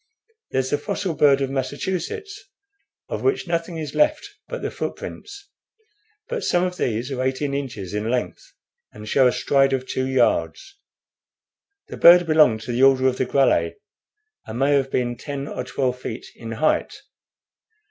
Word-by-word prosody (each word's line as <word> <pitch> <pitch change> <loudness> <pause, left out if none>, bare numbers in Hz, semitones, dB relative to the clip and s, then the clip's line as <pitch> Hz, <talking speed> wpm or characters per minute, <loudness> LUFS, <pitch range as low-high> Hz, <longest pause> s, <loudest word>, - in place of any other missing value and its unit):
There's 130 0 -1
the 145 - +1
fossil 200 -4 -3
bird 140 -2 +4
of 135 -1 -1
Massachusetts, 190 - -4 0.6
of - - -4
which 400 - 0
nothing 170 0 -2
is 150 -3 -5
left 305 +6 +1 0.2
but - - -6
the - - -2
footprints; 400 0 -7 0.8
but 485 -2 -4
some 175 0 +2
of 180 0 -2
these 120 -2 -2
are 130 -1 -2
eighteen 130 +2 -1
inches 115 -10 -5
in 105 +2 -2
length, 120 -7 -3 0.4
and 105 0 -11
show 130 +3 +4
a - - +3
stride 135 +1 +2
of 130 -1 -1
two 130 0 -2
yards. 390 - 0 1.1
The - - -7
bird 175 +1 +8
belonged 150 -9 +4
to 120 - -5
the 120 +2 -1
order 135 -1 +5
of 130 -1 +2
the 130 - 0
Grallae, 125 -12 +2 0.7
and 110 - -6
may 140 +3 +2
have 135 -1 +2
been 120 -2 -1
ten 140 0 -5
or 125 - -4
twelve 125 0 -2
feet 120 -2 -6
in 115 -1 -8
height. 155 +7 0
135 Hz, 165 wpm, -22 LUFS, 125-175 Hz, 1.1 s, bird